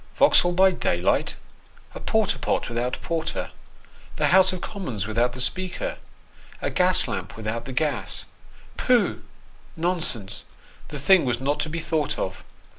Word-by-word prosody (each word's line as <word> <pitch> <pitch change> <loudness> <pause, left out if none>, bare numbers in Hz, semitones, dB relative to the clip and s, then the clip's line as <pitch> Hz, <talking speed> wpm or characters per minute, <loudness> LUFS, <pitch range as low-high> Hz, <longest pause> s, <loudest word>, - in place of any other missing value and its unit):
Vauxhall 175 0 +5
by 190 +1 +5
daylight! 90 - 0 0.6
A - - -7
porter - - 0
pot - - -1
with 115 - -5
out 125 +1 -2
porter, 165 0 -3 0.6
the - - +1
House 190 +1 +6
of 185 - -4
Commons 130 - -4
without 115 +3 0
the 125 - -7
Speaker, 185 - -2 0.6
a - - -2
gas 180 0 +4
lamp - - -5
without 115 +1 -4
the 135 - -6
gas 145 +3 -2 0.5
pooh, - - +2 0.6
nonsense, 160 - -2 0.4
the 145 - -7
thing 175 +7 +5
was 120 -3 0
not 140 +3 -1
to 155 - -1
be 165 - -4
thought 155 -3 -1
of. 95 - -4
150 Hz, 150 wpm, -24 LUFS, 120-180 Hz, 0.6 s, House